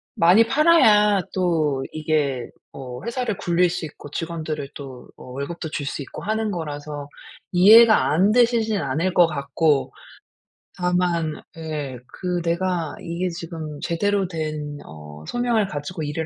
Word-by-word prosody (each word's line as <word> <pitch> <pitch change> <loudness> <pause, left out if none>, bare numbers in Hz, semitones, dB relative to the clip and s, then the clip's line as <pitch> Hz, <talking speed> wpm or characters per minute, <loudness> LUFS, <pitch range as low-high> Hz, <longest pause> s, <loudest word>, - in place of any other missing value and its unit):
많이 185 +7 +5
팔아야 220 - +5
또 155 -7 +1
이게 150 -5 -1 0.2
어 125 -1 -8
회사를 235 -4 -2
굴릴 175 0 +2
수 170 - -4
있고 145 -1 -11
직원들을 155 -4 -4
또 130 -3 -10
어 - - -13
월급도 155 +4 -5
줄 145 -2 -4
수 140 - -4
있고 135 - -8
하는 220 0 -1
거라서 145 -3 -6 0.4
이해가 215 -1 +7
안 190 +6 +4
되시지는 230 -4 +2
않을 155 +7 -1
것 175 -2 +5
같고. 140 -2 0 0.9
다만 175 -3 +1 0.2
예. 150 -5 -5
그 180 -2 -3
'내가 170 -1 -1
이게 175 +2 -3
지금 165 -3 -7
제대로 195 +2 0
된 155 -3 -4
어 75 0 -11
소명을 235 -4 +1
가지고 155 +2 -5
일을 150 +2 -3
165 Hz, 260 characters per minute, -22 LUFS, 145-185 Hz, 0.9 s, 이해가